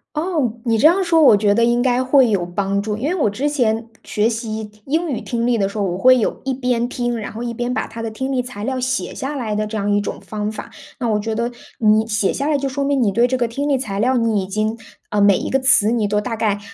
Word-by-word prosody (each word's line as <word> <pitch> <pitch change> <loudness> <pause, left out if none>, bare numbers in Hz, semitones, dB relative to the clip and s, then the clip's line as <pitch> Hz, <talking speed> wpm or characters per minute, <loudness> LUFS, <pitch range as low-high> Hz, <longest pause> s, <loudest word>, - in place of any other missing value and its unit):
哦， 300 - -1
你 230 -1 +2
这 260 - +2
样 380 +4 +3
说 330 -3 +3
我 225 - +8
觉 205 0 +2
得 235 - +3
应 240 +1 +2
该 255 0 +2
会 260 -2 +4
有 195 -4 0
帮 195 +3 -1
助， 210 0 -2
因 235 +7 -3
为 360 - 0
我 305 -11 +1
之 275 +8 -1
前 230 -5 0
学 215 +2 0
习 220 -2 -4 0.2
英 320 +5 -1
语 260 - -2
听 235 -1 -2
力 245 -1 +2
的 195 -2 +1
时 200 - -9
候， 210 - 0
我 180 -1 -2
会 255 +5 +5
有 220 - -1
一 270 - 0
边 250 -2 0
听， 240 -2 -2
然 215 - -6
后 225 - -6
一 240 -1 -3
边 240 +1 -3
把 - - -2
它 225 +1 -10
的 225 - -3
听 265 +5 -4
力 250 -2 0
材 240 -5 -8
料 260 +2 -2
写 255 +1 -2
下 280 +2 -4
来 225 -6 -3
的 215 - 0
这 215 +1 -6
样 205 -1 -1
一 205 - +3
种 205 - -5
方 210 0 -4
法。 220 - -8 0.3
那 245 - -1
我 210 -1 +1
觉 220 +2 -3
得 235 +2 -2 0.3
你 215 0 +4
写 215 -3 0
下 280 - -2
来 305 - +2
就 275 0 -2
说 280 +1 -2
明 280 -1 +1
你 210 -4 +2
对 235 +4 +3
这 255 +1 0
个 245 -2 0
听 280 +6 -3
力 280 - +2
材 210 -7 -3
料 255 +4 +2
你 225 -4 +1
已 - - -5
经 215 +3 -1 0.3
呃， 210 - 0
每 200 -1 +5
一 - - -4
个 270 - +2
词 255 -5 +4
你 225 -3 +1
都 210 0 0
大 230 +2 -3
概 210 -2 0
230 Hz, 310 characters per minute, -19 LUFS, 215-260 Hz, 0.3 s, 我